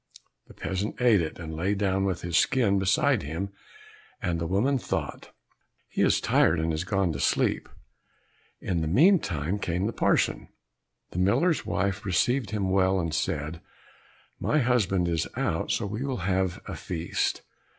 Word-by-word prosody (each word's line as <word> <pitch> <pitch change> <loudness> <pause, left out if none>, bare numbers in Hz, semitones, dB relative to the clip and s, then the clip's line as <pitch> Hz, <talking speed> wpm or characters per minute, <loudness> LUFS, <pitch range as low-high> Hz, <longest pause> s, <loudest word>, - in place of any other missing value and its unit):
The - - -15
peasant 95 +3 -3
ate 120 -6 +4
it, 80 - -4
and 80 -2 -7
lay 95 +6 0
down 95 -1 0
with 95 -3 -2
his 85 -1 -3
skin 105 -5 +3
beside 120 +7 +2
him, 80 +7 -4 0.7
and 85 -2 -2
the 85 - -1
woman 120 +10 +1
thought, - - -4 0.6
"He - - -3
is - - +4
tired 80 0 +3
and 80 +1 0
has 80 +1 -2
gone 95 -2 0
to 70 - -5
sleep." - - +1 0.9
In 85 -3 -2
the 80 - -1
meantime 100 - +3
came 90 0 -1
the 115 - -2
parson; - - +1 0.6
the 90 - -4
miller's 130 - +2
wife 100 +2 -1
received 115 +5 +1
him 100 -3 -1
well, 95 0 +3
and 85 -3 -2
said, 80 -2 -2 0.8
"My 155 - +1
husband 105 - +2
is 85 -2 0
out, - - -1
so - - 0
we 105 +4 -4
will 135 -2 -2
have 95 -2 0
a - - -6
feast." 85 -1 -2
95 Hz, 160 wpm, -27 LUFS, 85-105 Hz, 0.9 s, ate